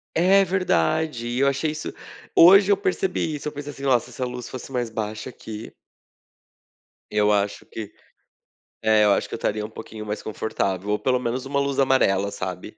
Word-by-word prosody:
É, 190 +4 +5
verdade. 160 - 0
E 120 +2 -2
eu 140 - +4
achei 140 +3 0
isso 155 0 -6 0.4
hoje 195 +4 +8
eu - - +6
percebi 185 -4 -1
isso, 145 - -6
eu - - -2
pensei 145 0 -7
assim: 140 0 -11
"Nossa, 125 -4 +3
se - - -14
essa 130 - -3
luz 125 -1 -6
fosse 130 +1 -8
mais 120 -3 -1
baixa 110 +2 -4
aqui" 110 -2 -9 1.4
"eu 105 0 +3
acho 100 -1 0
que" 110 -2 -8 0.9
é, 110 -1 +5
eu 105 - +5
acho - - 0
que - - -11
eu - - -2
estaria 105 0 -1
um 110 - -8
pouquinho 110 -1 -9
mais 105 +1 -4
confortável, 100 -2 -2
ou 105 - +1
pelo 125 -1 +1
menos 125 +1 -3
uma 140 0 0
luz 140 -1 -1
amarela, 100 -8 +3
sabe. 95 +1 -6
120 Hz, 195 wpm, -24 LUFS, 105-145 Hz, 1.4 s, hoje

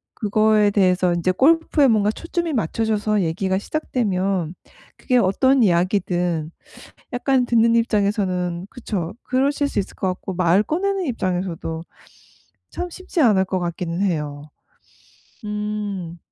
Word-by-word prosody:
그거에 215 0 +3
대해서 185 -3 +2
이제 175 +2 +1
골프에 300 - +3
뭔가 210 -3 +3
초점이 335 +5 -3
맞춰져서 215 0 0
얘기가 190 +3 -1
시작되면 195 - -1 0.4
그게 250 -2 +1
어떤 255 +6 +3
이야기든 175 -3 +1 0.6
약간 250 0 +1
듣는 230 0 +3
입장에서는 195 -5 0
그쵸. 200 -9 -4
그러실 280 +3 +1
수 - - -3
있을 195 - -7
것 190 - -1
같고 185 +1 -4
말 180 +2 +3
꺼내는 375 - -1
입장에서도 180 - -3 0.9
참 355 - -5
쉽지 365 -1 -3
않을 205 -7 +4
것 185 0 -2
같기는 175 0 -3
해요. 150 -7 -2 1.0
음. 210 -4 -4
200 Hz, 280 characters per minute, -21 LUFS, 180-235 Hz, 1.0 s, 않을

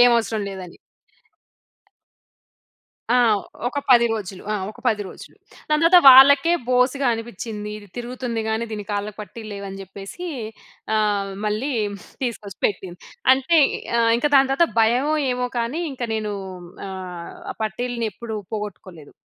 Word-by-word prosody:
ఏం 245 0 +8
అవసరం 220 -2 -2
లేదని. 185 -3 -9 2.3
ఆ! - - +4 0.5
ఒక 285 - -4
10 240 -2 +7
రోజులు. 195 -4 -5
ఆ! - - 0 0.2
ఒక 230 - -15
10 210 -3 0
రోజులు. - - -13 0.3
దాని 305 +1 +2
తర్వాత 355 +2 +8
వాళ్ళకే 280 +5 +8 0.2
బోసిగా 255 +2 +2
అనిపించింది. 220 -2 -6
ఇది 205 -1 -15
తిరుగుతుంది 245 -1 -4
కాని 220 +1 -1
దీని 210 -1 -5
కాళ్ళకి 205 0 -3
పట్టీలు 215 +1 -9
లేవని 195 -1 -7
చెప్పేసీ, 195 - -8 0.7
ఆహ్, 205 -2 0
మళ్ళీ 215 +7 -1 0.5
తీసుకొచ్చి 215 -6 -4
పెట్టింది. 185 -3 -5 0.4
అంటే 270 +6 +2 0.4
ఆహ్, 230 0 +4
ఇంకా 295 +4 0
దాని 270 0 +5
తర్వాత 305 +5 +3
భయమో 250 +7 +3 0.2
ఏమో 250 0 -2
కానీ 235 +8 -2
ఇంకా, 250 -2 -4
నేనూ 215 -1 -2 0.5
ఆహ్, 180 -2 -7 0.2
ఆ - - -25
పట్టీలని 235 +2 -3
ఎప్పుడు 220 +1 -6 0.2
పోగొట్టుకోలేదు. 185 -7 -7
225 Hz, 135 wpm, -22 LUFS, 205-250 Hz, 2.3 s, ఏం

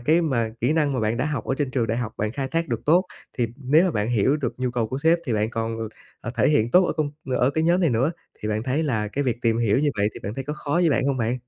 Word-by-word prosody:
cái 155 +8 +3
mà 130 -9 0
kỹ 125 +6 +2
năng 150 -3 +1
mà 130 - -1
bạn 110 +1 0
đã 130 - 0
học 150 -7 -3
ở - - -1
trên 145 -3 -1
trường 125 -3 0
đại 115 +1 -1
học 110 -3 -3
bạn 105 +1 -2
khai 135 0 -3
thác 165 +3 -1
được 115 -2 -2
tốt, 175 +5 +5 0.3
thì 120 - +2
nếu 145 +5 +3
mà 185 - +2
bạn 105 -4 -1
hiểu 120 +5 +2
được 135 -6 -3
nhu 130 -1 0
cầu 120 -2 -1
của 130 - -3
sếp 165 +3 +3
thì 125 - 0
bạn 110 0 0
còn, 115 -1 -3 0.4
ờ, 115 - -5
thể - - +3
hiện 120 -6 +2
tốt 180 +4 +5
ở - - 0
công 150 -2 -1 0.3
ở 125 +2 +3
cái 160 +3 0
nhóm 175 +3 +3
này 165 -6 +3
nữa. 130 +8 +1 0.3
Thì 105 - -3
bạn 110 +1 -1
thấy 135 +5 0
là 110 -8 -1
cái 140 +6 -2
việc 120 -1 -2
tìm 115 -1 +2
hiểu 115 +1 +2
như 145 0 +2
vậy 100 +1 +3
thì - - -9
bạn 105 +3 -5
thấy 135 - -5
có 150 - -3
khó 150 -1 -5
với 170 -2 +3
bạn 135 - +1
hông 140 - +1
bạn? 120 0 0
130 Hz, 320 wpm, -24 LUFS, 115-150 Hz, 0.4 s, tốt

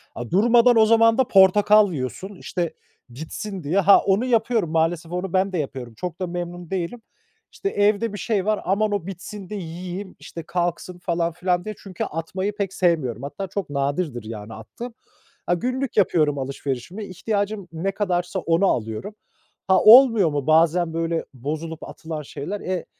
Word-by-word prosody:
a 120 -1 -6
durmadan 235 +4 +5
o 220 - +7
zaman 230 0 +5
da 260 -2 +3
portakal 205 +1 +5
yiyorsun 155 +9 -5
işte 175 -3 -3 0.4
bitsin 165 - -7
diye. 165 +7 +1
Ha, 200 +1 +7
onu 200 +5 +1
yapıyorum, 230 -6 +1
maalesef 165 +1 0
onu 180 0 -3
ben 190 +1 +1
de - - 0
yapıyorum. 130 -5 -5
Çok 165 +9 -6
da 185 - -1
memnun 175 0 -6
değilim. 190 +5 -3 0.5
İşte, 395 - -3
evde 210 - +1
bir - - -5
şey 205 -3 -1
var, 215 0 +1
"Aman, 205 +3 +1
o 200 -4 -2
bitsin 195 +1 -8
de 210 - -5
yiyeyim, 180 +2 -6
işte, 165 - -9
kalksın." 175 +1 -3
falan 170 -1 -1
filan 180 +1 -1
diye 215 0 -5
çünkü 190 -3 -5
atmayı 185 +6 -3
pek 200 -3 -3
sevmiyorum. 150 - 0
Hatta 190 +8 -5
çok 195 -1 -4
nadirdir 140 -2 -2
yani 110 0 -8
attığım. 230 - -9 0.5
Ha, - - +1
günlük 255 +7 -2
yapıyorum 155 -7 +3
alışverişimi, 135 - -4
ihtiyacım 200 +1 -3
ne 175 +5 -2
kadarsa 185 -2 -1
onu 170 +2 +2
alıyorum. 115 - -2 0.5
Ha, 190 -1 +5
olmuyor 230 -5 +8
mu 145 -2 -3
bazen 165 +1 +3
böyle 165 0 -1
bozulup 155 +5 -5
atılan 160 -2 -6
şeyler? 150 +7 -6
Eee, 185 -2 -3
180 Hz, 165 wpm, -23 LUFS, 160-205 Hz, 0.5 s, olmuyor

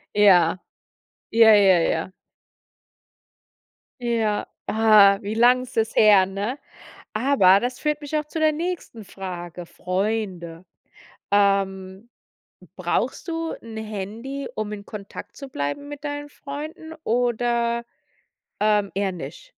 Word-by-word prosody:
Ja. 185 -4 +5 0.7
Ja, 225 -1 +7
ja, 195 -4 +5
ja. 165 +2 -1 1.9
Ja, 225 -3 0 0.2
ah, 210 -3 +5
wie 210 +2 -4
lang 245 +2 +5
ist 250 - -12
das 225 0 0
her, 205 -3 +6
ne? 200 +8 -4 0.5
Aber 215 -5 +4
das 245 0 -3
führt 300 0 -1
mich 295 +1 -3
auch 300 - -2
zu 310 +2 -5
der 310 0 +4
nächsten 330 - -5
Frage: 175 -2 -7
Freunde. 185 -3 -3 0.7
Ähm, 195 +1 0 0.7
brauchst - - -2
du 330 0 -3
'n 225 -1 -10
Handy, 220 +6 -6
um 215 -1 -4
in 200 -1 -7
Kontakt 200 -2 -9
zu 275 -2 -9
bleiben 200 - -4
mit 290 0 -9
deinen 290 0 -4
Freunden 300 +3 -8
oder, 235 0 0 0.8
ähm, 210 -2 +2
eher 195 0 0
nicht? - - -9
220 Hz, 120 wpm, -23 LUFS, 195-265 Hz, 1.9 s, Ja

